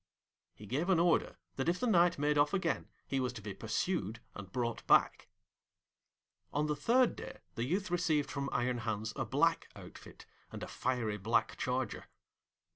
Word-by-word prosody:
He 105 - -11
gave 145 - -1
an 180 -3 +4
order 170 -1 +2 0.2
that 135 +5 +1
if 175 - 0
the - - 0
Knight 175 -6 +4
made 145 +1 +1
off 145 +4 +3
again 170 -6 -1 0.2
he 135 - -1
was 130 -1 0
to 115 - -8
be 105 - -5
pursued 110 - -2
and 100 -2 -9
brought 120 -1 -2
back. - - +4 1.2
On 145 +1 0
the 150 0 0
third 245 - +3
day - - -8 0.2
the 115 - -2
youth 185 +6 -1
received 160 -5 +1
from 140 0 -2
Iron 125 0 0
Hans 110 -1 -3
a - - -2
black - - +2
outfit, - - -12 0.3
and - - -7
a - - -4
fiery 120 -5 -1
black 110 +4 +1
charger. 125 -2 -2
135 Hz, 175 wpm, -33 LUFS, 115-170 Hz, 1.2 s, an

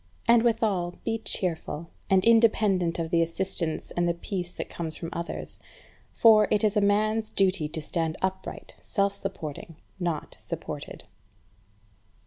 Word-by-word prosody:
And 235 0 +6
withal, 215 -7 +1
be 225 0 -1
cheerful, 170 -5 -2 0.2
and 190 -1 +4
independent 215 -6 +4
of 165 -1 -3
the 170 -2 +4
assistance 170 -1 -1
and 175 0 0
the 170 - 0
peace 175 0 -4
that - - -6
comes 160 -2 -5
from 165 - -5
others; 170 0 -5 0.5
for, 215 -2 +6
it 210 0 +2
is 215 0 +2
a 210 - +3
man's 215 +2 +2
duty 185 -5 +1
to 160 0 -4
stand 160 0 -2
upright, 190 0 -4
self 200 -1 0
supporting, 170 -5 -5 0.2
not 170 -4 -3
supported. - - -6
190 Hz, 140 wpm, -27 LUFS, 170-215 Hz, 0.5 s, And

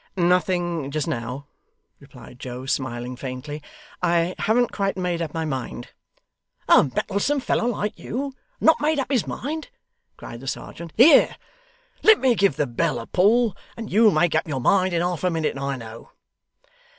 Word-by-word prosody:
'Nothing 175 -3 +1
just 155 +2 -2
now,' 130 -1 -4 0.5
replied 125 - -14
Joe, 125 0 -7
smiling 125 -2 -3
faintly. 135 +4 -6 0.4
'I 170 0 +1
haven't 235 +2 +2
quite 195 -2 -1
made 180 -2 -1
up 160 -3 -3
my 160 0 -3
mind.' 130 -4 -5 0.8
'A - - +6
mettlesome 200 - -1
fellow 240 - 0
like 210 -3 -2
you, 275 +3 -4 0.3
and - - -4
not 320 -2 +5
made 305 +1 +1
up 275 0 -2
his 250 -6 +1
mind!' 310 - -5 0.5
cried 115 - -9
the 135 - -11
serjeant. 165 +4 -6
'Here 260 +9 +7 0.7
let 440 -1 +7
me 260 -2 +3
give 200 -7 +2
the 150 0 0
bell 120 -1 -1
a 115 - -6
pull, 215 - +3 0.2
and 225 -2 -7
you'll 215 +2 +6
make 170 -1 +2
up 160 - 0
your 140 -4 -2
mind 185 +7 +3
in 170 0 0
half 180 -1 -2
a 180 - +3
minute, 160 -2 -1
I 140 0 -2
know. 115 -2 -10
170 Hz, 170 wpm, -23 LUFS, 135-215 Hz, 0.8 s, Here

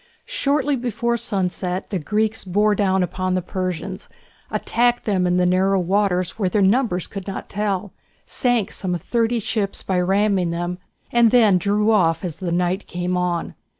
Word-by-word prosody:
Shortly 290 - 0
before 235 -1 -1
sunset 190 -4 -2
the 190 - -1
Greeks 215 +6 -1
bore 205 +3 +2
down 190 -2 +2 0.2
on 185 0 +1
the 185 - 0
Persians, 185 +1 -4 0.4
attacked 240 +1 +1
them 185 -4 +1
in 180 0 +2
the 180 - +3
narrow 190 +2 +2
waters 185 +1 0
where 190 -3 +1
their 200 +2 +2
numbers 195 -3 +2
could 195 -1 -8
not 195 - -6
tell, 200 -2 -2 0.3
sank 245 -6 0
some 180 -3 -2
thirty 230 +6 0
ships 210 -2 -2
by 185 -2 0
ramming 195 -1 +2
them, 175 +1 -3 0.3
and 235 -1 +5
then 215 -6 +5
drew 210 +3 +2
off 170 -6 +2
as 170 -4 -5
the 180 -3 -3
night 180 +3 0
came 180 +1 -2
on. 180 -1 -1
195 Hz, 165 wpm, -21 LUFS, 180-215 Hz, 0.4 s, and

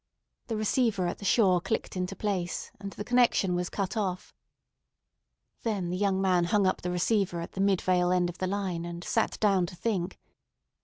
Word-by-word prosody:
The 225 - -2
receiver 215 -3 +1
at 175 - -3
the 200 - -7
shore 190 -4 +4
clicked 190 - -2
into 185 +1 -2
place, 190 -5 -2
and 200 0 -5
the 205 - -6
connection 240 -6 +3
was 175 0 -1
cut 195 +1 -3
off. 185 -4 -2 1.3
Then 200 -6 -2
the - - -1
young 195 0 +1
man 185 -2 +3
hung 200 +3 +2
up 185 - +1
the 180 - -3
receiver 180 0 +1
at 170 - -6
the 195 - -3
Midvale 185 -2 +2
end 180 -1 +3
of 175 0 -7
the 185 - 0
line, 185 -3 -2
and 170 0 -6
sat 225 - 0
down 195 -4 +3
to 180 - -9
think. 185 -1 -2
190 Hz, 190 wpm, -29 LUFS, 180-205 Hz, 1.3 s, shore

